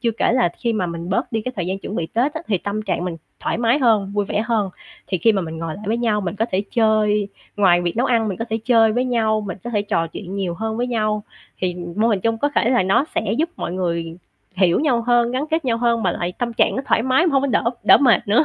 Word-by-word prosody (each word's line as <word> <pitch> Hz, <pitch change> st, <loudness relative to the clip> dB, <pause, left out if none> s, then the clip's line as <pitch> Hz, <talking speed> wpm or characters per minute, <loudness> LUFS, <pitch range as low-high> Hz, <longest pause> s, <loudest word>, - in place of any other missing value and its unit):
Chưa 235 Hz, -1 st, +1 dB
kể -, -, +2 dB
là 245 Hz, -8 st, +3 dB
khi 235 Hz, -2 st, -1 dB
mà 190 Hz, -5 st, -1 dB
mình 170 Hz, 0 st, -6 dB
bớt 195 Hz, -, -1 dB
đi 225 Hz, -, 0 dB
cái 255 Hz, +3 st, -4 dB
thời 175 Hz, -, -2 dB
gian 190 Hz, +1 st, -2 dB
chuẩn 200 Hz, -, -7 dB
bị 165 Hz, -, -1 dB
Tết 255 Hz, -, 0 dB
á, 315 Hz, -, -3 dB
thì 195 Hz, -, +1 dB
tâm 205 Hz, +3 st, -3 dB
trạng 180 Hz, -, -2 dB
mình 175 Hz, -2 st, -4 dB, 0.2 s
thoải -, -, -2 dB
mái 240 Hz, +4 st, +2 dB
hơn, 215 Hz, -6 st, +2 dB
vui 205 Hz, -1 st, 0 dB
vẻ 210 Hz, -, -1 dB
hơn, 215 Hz, -5 st, 0 dB, 0.4 s
thì 185 Hz, -, -1 dB
khi 225 Hz, +5 st, +4 dB
mà 195 Hz, -3 st, 0 dB
mình 160 Hz, -1 st, -6 dB
ngồi 165 Hz, -1 st, -4 dB
lại 210 Hz, -, -10 dB
với 225 Hz, +3 st, +1 dB
nhau 225 Hz, -3 st, +1 dB
mình 190 Hz, -2 st, -3 dB
có 225 Hz, +2 st, 0 dB
thể 190 Hz, +2 st, +1 dB
chơi 215 Hz, -3 st, +2 dB, 0.3 s
ngoài 180 Hz, -4 st, +4 dB
việc 175 Hz, +3 st, -2 dB
nấu 255 Hz, +3 st, +2 dB
ăn 225 Hz, -3 st, +2 dB
mình 190 Hz, -, -3 dB
có 230 Hz, -, -2 dB
thể 225 Hz, -, 0 dB
chơi 225 Hz, -3 st, +4 dB
với 245 Hz, +2 st, 0 dB
nhau, 220 Hz, -3 st, +1 dB
mình 195 Hz, -3 st, -6 dB
có 240 Hz, -, -4 dB
thể 210 Hz, -3 st, 0 dB
trò 165 Hz, -5 st, 0 dB
chuyện 185 Hz, +3 st, -8 dB
nhiều 190 Hz, -3 st, -2 dB
hơn 220 Hz, +4 st, -3 dB
với 245 Hz, -, -1 dB
nhau, 215 Hz, -3 st, -1 dB, 0.4 s
thì 180 Hz, -1 st, -1 dB, 0.2 s
mô 225 Hz, +2 st, +3 dB
hình 205 Hz, -4 st, +1 dB
chung 225 Hz, +3 st, 0 dB
có 290 Hz, -, +1 dB
thể 235 Hz, -, +2 dB
là 245 Hz, -5 st, +3 dB
nó 190 Hz, +8 st, +2 dB
sẽ 220 Hz, -, 0 dB
giúp 325 Hz, +2 st, +1 dB
mọi -, -, -4 dB
người 170 Hz, -2 st, -2 dB, 0.4 s
hiểu 180 Hz, -2 st, +3 dB
nhau 255 Hz, -6 st, +1 dB
hơn, 240 Hz, 0 st, +2 dB
gắn 260 Hz, +3 st, -1 dB
kết 320 Hz, -1 st, 0 dB
nhau 235 Hz, -3 st, +1 dB
hơn, 235 Hz, -1 st, +1 dB
mà -, -, +2 dB
lại 175 Hz, 0 st, -3 dB
tâm 240 Hz, -1 st, -2 dB
trạng -, -, +2 dB
nó 265 Hz, -, -2 dB
thoải 225 Hz, -, +2 dB
mái 260 Hz, +7 st, +3 dB
mà 330 Hz, -, +1 dB
hông 270 Hz, -1 st, +3 dB
có -, -, +1 dB
đỡ 225 Hz, -, +1 dB, 0.2 s
đỡ -, -, +8 dB
mệt 250 Hz, -6 st, +3 dB
nữa. 230 Hz, +9 st, +4 dB
215 Hz, 290 wpm, -21 LUFS, 190-235 Hz, 0.4 s, đỡ